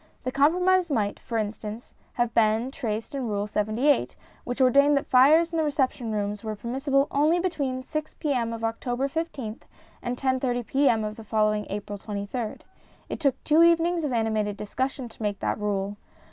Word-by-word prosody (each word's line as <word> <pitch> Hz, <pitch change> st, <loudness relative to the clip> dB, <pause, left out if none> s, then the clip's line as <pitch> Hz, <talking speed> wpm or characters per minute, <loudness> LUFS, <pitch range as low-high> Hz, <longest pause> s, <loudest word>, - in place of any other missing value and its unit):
The 255 Hz, -, -2 dB
compromise 355 Hz, +6 st, +3 dB
might, 210 Hz, -7 st, 0 dB
for 230 Hz, -, -4 dB
instance, 215 Hz, +1 st, -5 dB, 0.2 s
have 240 Hz, -1 st, 0 dB
been 225 Hz, +3 st, +2 dB
traced 225 Hz, +1 st, -4 dB
in 265 Hz, -3 st, -2 dB
Rule 205 Hz, -1 st, -1 dB
78, 215 Hz, +7 st, +1 dB, 0.3 s
which 245 Hz, +2 st, -4 dB
ordained 280 Hz, +3 st, +5 dB
that 275 Hz, -, -1 dB
fires 310 Hz, +7 st, +5 dB
in -, -, 0 dB
the -, -, +2 dB
reception 265 Hz, -5 st, 0 dB
rooms 205 Hz, 0 st, -2 dB
were 215 Hz, -1 st, -3 dB
permissible 270 Hz, +6 st, 0 dB
only 305 Hz, +4 st, +3 dB
between 280 Hz, -8 st, -2 dB
6 305 Hz, +2 st, -4 dB
P.M. 250 Hz, -6 st, -1 dB
of 230 Hz, 0 st, -6 dB
October 245 Hz, +3 st, -1 dB
I5th 275 Hz, -8 st, -4 dB, 0.4 s
and 245 Hz, 0 st, -3 dB
10.30 255 Hz, -2 st, 0 dB
P.M. 265 Hz, -5 st, +2 dB
of 215 Hz, 0 st, -4 dB
the 225 Hz, -, -9 dB
following 215 Hz, -1 st, +1 dB
April 205 Hz, 0 st, -5 dB
23rd. 210 Hz, +3 st, -4 dB, 0.5 s
It -, -, -4 dB
took 275 Hz, -4 st, 0 dB
two 310 Hz, +2 st, +4 dB
evenings 335 Hz, 0 st, +4 dB
of 295 Hz, -, -1 dB
animated 220 Hz, -3 st, 0 dB
discussion 255 Hz, +5 st, -3 dB
to 225 Hz, -, -16 dB
make 205 Hz, -2 st, -1 dB
that -, -, -2 dB
rule. 205 Hz, -1 st, -2 dB
245 Hz, 175 wpm, -26 LUFS, 215-280 Hz, 0.5 s, ordained